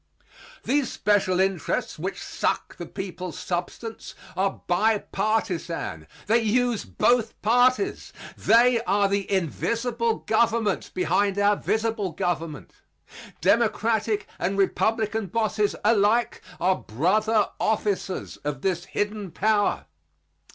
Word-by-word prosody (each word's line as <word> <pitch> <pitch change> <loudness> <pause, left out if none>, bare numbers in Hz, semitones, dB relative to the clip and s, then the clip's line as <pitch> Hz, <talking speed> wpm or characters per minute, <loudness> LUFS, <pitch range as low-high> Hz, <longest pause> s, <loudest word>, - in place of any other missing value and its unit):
These 275 +1 +1
special 190 -3 +1
interests 190 -4 -1
which - - -4
suck - - -2
the 175 - -7
people's 185 -2 -6
substance 180 +6 -5 0.2
are 195 +1 -1
bi 215 +5 +3
partisan. 180 - -2 0.2
They 225 +4 +4
use 240 +1 +1
both 225 - +1
parties. 250 - +2 0.2
They 235 0 +4
are 200 0 +3
the 200 0 -1
invisible 230 - 0
government 225 -2 +1
behind 200 +2 +1
our 205 0 +4
visible 220 -4 -1
government. 165 -3 -3 0.7
Democratic 220 -2 +2
and 195 +2 -1
Republican 220 +1 +1
bosses 215 +1 0
alike 220 +2 +3 0.2
are 185 +2 +2
brother 210 - +1
officers 205 -3 -1
of 145 -2 -5
this 180 -3 0
hidden 205 -1 -3
power. 205 +4 +1
210 Hz, 105 wpm, -25 LUFS, 185-225 Hz, 0.7 s, They